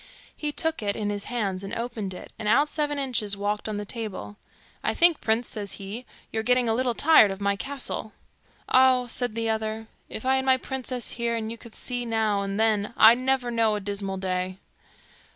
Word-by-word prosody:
He 300 -1 -2
took 320 0 -1
it 205 -1 -1
in 205 -1 -2
his 205 -1 -3
hands 200 -6 -2
and 195 - -5
opened 230 -5 -4
it, - - -11
and 215 - -3
out 280 +8 +4
Seven 295 -2 -1
Inches 230 -7 0
walked 205 +2 -2
on 210 - -3
the 205 - -4
table. 210 -2 -5 0.5
'I - - 0
think, 340 -2 +5
prince,' 225 +2 +1
says 205 -2 -4
he, 205 +5 -6 0.2
'you're 220 - -1
getting 250 +1 +2
a 225 - +2
little 245 0 0
tired 295 -8 +6
of 195 0 -5
my 200 0 +1
castle?' 270 -2 -4 0.6
'Ah!' 255 -1 +5
says 245 +1 -2
the 230 0 -1
other, 220 0 -2 0.2
'if 220 - -7
I 265 +1 +3
had 265 - -1
my 260 -1 +5
princess 255 -1 -3
here, 235 -1 -1
and 225 0 -4
could 235 -2 -12
see 245 -1 -3
you 240 - -3
now 220 -3 +1
and 200 +1 -3
then, 220 0 +1
I'd 230 +3 +8
never 255 -1 0
know 225 -2 +2
a - - -2
dismal 200 -1 -3
day. 185 0 -2
225 Hz, 205 wpm, -26 LUFS, 205-250 Hz, 0.6 s, I'd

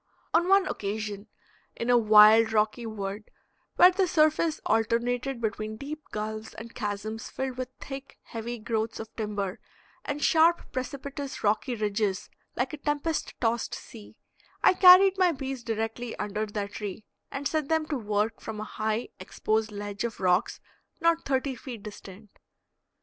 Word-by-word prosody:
On 345 +2 +3
one 390 0 +5
occasion, 205 0 -4 0.5
in 235 +1 -1
a - - +6
wild 220 0 +7
rocky 215 +2 +1
wood, 205 -1 -5 0.5
where 360 - +8
the 375 0 +1
surface 310 0 +2
alternated 235 +3 0
between 215 -1 -3
deep 300 +5 -6
gulfs 215 +1 -5
and 230 +1 -9
chasms 215 +3 -4
filled 260 -1 -4
with 255 0 -3
thick, 275 0 -8
heavy 235 +1 -5
growths 220 0 -2
of 220 - -9
timber 205 -3 -3 0.4
and 290 0 -3
sharp, 330 +1 +4
precipitous, 275 +2 -5
rocky 220 +4 +1
ridges 210 -2 -1 0.2
like - - -1
a - - -4
tempest 295 +2 -2
tossed 230 0 0
sea, 220 -3 -12 0.5
I - - +7
carried 375 +1 +8
my 360 -2 +4
bees 265 -2 -5
directly 225 +1 -3
under 210 +1 -2
their 205 -1 -3
tree, 205 0 -7 0.2
and 280 0 -3
set 310 -3 -2
them 320 -1 +2
to 300 - 0
work 215 -2 -1
from 220 -1 -6
a - - -3
high, 215 +2 -2
exposed 220 0 -1
ledge 205 0 -5
of 235 -2 -4
rocks 185 +3 +1 0.4
not 335 -1 +2
thirty 265 0 0
feet 245 -4 -9
distant. 205 -1 -11
225 Hz, 150 wpm, -28 LUFS, 215-275 Hz, 0.5 s, where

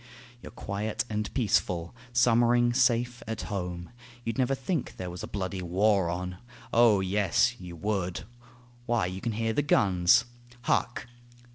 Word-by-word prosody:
You're - - -9
quiet 105 0 -3
and 105 0 -2
peaceful, 90 -8 0 0.2
summering 120 0 +4
safe 120 0 +2
at 110 0 -4
home; 90 -1 -4 0.3
You'd 115 +3 -3
never 130 +1 +2
think 135 +3 -3
there 90 -1 -5
was 90 +3 -7
a - - -5
bloody 95 -1 -4
war 95 +1 +2
on!... 90 +1 -4 0.4
O 115 -4 +5
yes, 100 +4 +2
you 90 -2 -9
would... 95 -1 -2 0.6
why, 120 -4 +1
you 90 +1 -5
can 115 -2 -2
hear 115 +1 -1
the 145 - +2
guns. 95 -6 +4 0.4
Hark! 120 +1 0
105 Hz, 145 wpm, -28 LUFS, 90-120 Hz, 0.6 s, O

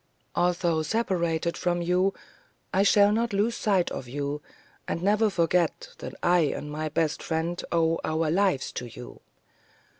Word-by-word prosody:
Although 175 -2 +1
separated 170 -3 0
from 175 -1 -1
you, 180 +3 +2 0.6
I 190 - +3
shall 205 0 +5
not 230 +1 0
lose 215 +4 +1
sight 195 -4 +1
of 125 - -5
you, 145 +3 -3 0.5
and 170 - -3
never 210 +2 +3
forget 170 -2 +1
that - - -7
I 175 0 +4
and 150 -1 -1
my 155 +1 -3
best 155 0 0
friend 165 +2 -2
owe 165 -1 +2
our 155 0 0
lives 185 -5 +1
to 125 - -5
you. 120 +1 -11
170 Hz, 150 wpm, -27 LUFS, 155-195 Hz, 0.6 s, shall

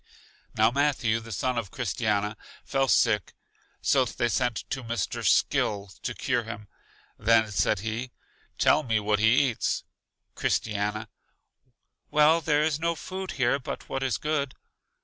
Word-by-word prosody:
Now 110 +2 +4
Matthew, 130 -5 +1
the 115 0 -10
son 125 +5 -1
of 105 -5 -6
Christiana, 105 -1 -1 0.3
fell 135 -1 +1
sick, 105 -4 +2 0.5
so 135 -2 +4
they 120 0 -1
sent 125 -2 -1
to 135 -2 -3
Mr. 115 -6 -3
Skill 100 -2 +2
to 120 - -4
cure 125 -4 0
him. 110 -2 -8 0.5
Then 110 0 +3
said 105 -1 +1
he: 115 +4 -3 0.5
Tell - - +4
me 115 -6 0
what 105 0 +1
he 120 +5 +4
eats. 115 - -2 0.5
Christiana: 105 +1 -1 1.0
Well, 150 +2 +5
there 150 -1 +2
is 155 -1 0
no 170 +1 0
food 190 +2 -6
here 130 +1 +1
but 130 - -7
what 135 - -2
is 130 -4 0
good. 150 -3 -2
120 Hz, 145 wpm, -27 LUFS, 110-140 Hz, 1.0 s, Well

